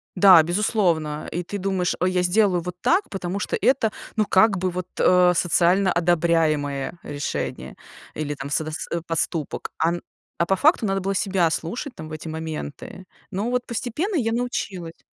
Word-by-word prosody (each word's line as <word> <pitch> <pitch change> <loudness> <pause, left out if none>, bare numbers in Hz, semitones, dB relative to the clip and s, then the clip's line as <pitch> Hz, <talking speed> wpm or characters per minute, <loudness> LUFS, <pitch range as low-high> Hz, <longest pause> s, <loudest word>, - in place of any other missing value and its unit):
Да, 180 -3 +8
безусловно, 170 -4 0
и 175 - -2
ты 205 +4 -5
думаешь: 190 -2 -1
"Ой, 185 +1 +2
я 180 -1 +1
сделаю 180 0 +2
вот 180 +1 -6
так, 380 +4 +2
потому 190 0 -4
что - - -2
это, 230 0 +2 0.3
ну, 215 - +3
как 200 +1 +4
бы 185 +1 0
вот, 180 0 -5
а, 180 -1 +5
социально 180 +2 +3
одобряемое 165 -4 +1
решение, 145 -1 -4 0.4
или 150 -1 -3
там 140 0 -7
содас 155 +1 -2
э, 170 - -1
поступок." 165 -2 -2
А 160 - +2
н 175 - -4 0.4
а 170 - +2
по 195 - +3
факту 290 - +3
надо 195 0 0
было 195 +1 -1
себя 190 -3 +2
слушать 235 - -4
там 155 -1 -8
в - - -12
эти 155 +1 -7
моменты. 160 +3 -6 0.2
Ну 205 +6 -2
вот 250 0 0
постепенно 260 - -2
я 230 -8 +1
научилась. 195 -8 -4
180 Hz, 175 wpm, -23 LUFS, 165-200 Hz, 0.4 s, Да